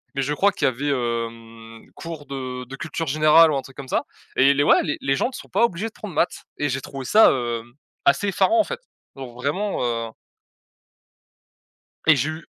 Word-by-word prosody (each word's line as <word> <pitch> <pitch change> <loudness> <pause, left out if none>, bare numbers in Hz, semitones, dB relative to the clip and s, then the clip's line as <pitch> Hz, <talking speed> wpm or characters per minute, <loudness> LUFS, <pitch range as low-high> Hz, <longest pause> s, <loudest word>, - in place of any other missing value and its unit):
mais 135 - 0
je 145 - -1
crois 200 +7 +3
qu'il - - -2
y - - +5
avait, 130 +4 -4
hem, 115 -3 -4
cours 165 -3 -8
de 130 -2 -6
de 130 +2 -9
culture 165 +2 -4
générale 155 +2 +5
ou 140 - 0
un 135 - -2
truc 135 -1 -15
comme 135 -1 -8
ça - - -1 0.3
et 140 +1 +5
les 145 - +3
ouais, - - +5
les 150 - -2
les 135 0 +1
gens 190 - +1
ne 260 - -9
sont - - -9
pas - - +2
obligés 200 -1 -3
de 220 - -11
prendre 200 -6 -9
maths 170 - 0
et 145 - 0
j'ai 135 +1 -2
trouvé 135 -2 -7
ça, 220 - +6
hem, 120 -2 -3 0.3
assez 140 +9 +3
effarant 335 - +3
en - - +5
fait, 480 +8 -6 0.4
donc 130 -3 -9
vraiment, 150 +11 -2
heu 115 -2 -2 2.0
Et 155 -2 +7
j'ai 145 +5 0
eu 155 0 -8
140 Hz, 215 wpm, -23 LUFS, 125-165 Hz, 2.0 s, Et